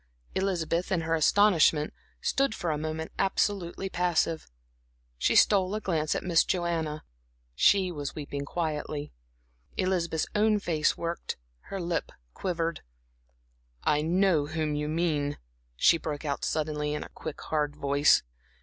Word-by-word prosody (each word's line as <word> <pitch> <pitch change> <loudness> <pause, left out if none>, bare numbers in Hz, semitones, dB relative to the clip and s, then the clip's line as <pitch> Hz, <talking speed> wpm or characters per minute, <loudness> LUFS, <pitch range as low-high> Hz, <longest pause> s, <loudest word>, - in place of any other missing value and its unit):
Elizabeth, 180 -2 -1
in 180 -3 +2
her 165 0 -1
astonishment, 165 -2 +4 0.3
stood 270 -5 +1
for 170 - -2
a 150 - -1
moment 160 +1 -4
absolutely 195 -1 0
passive. 170 -3 0 0.7
She - - +2
stole 195 -1 +4
a - - -1
glance 160 -7 0
at - - -2
Miss 170 -3 +4
Joanna; 165 -4 -1 0.5
she 185 - +4
was 145 -4 -5
weeping 145 -1 -4
quietly. 150 - -3 0.6
Elizabeth's 175 -4 0
own 215 0 +3
face 160 -6 +1
worked, 170 0 -4 0.3
her 195 - -5
lip 170 -2 -2 0.2
quivered. 170 -2 -2 1.0
"I 150 0 +3
know 170 -2 +2
whom 155 -1 -1
you 150 0 -1
mean," 155 -3 0 0.4
she 165 - +5
broke 150 -1 -4
out, 140 -1 -2
suddenly, 150 -1 -1
in - - -3
a - - -11
quick 155 -2 -7
hard 150 -2 -1
voice. 140 0 +4
165 Hz, 135 wpm, -28 LUFS, 150-180 Hz, 1.0 s, she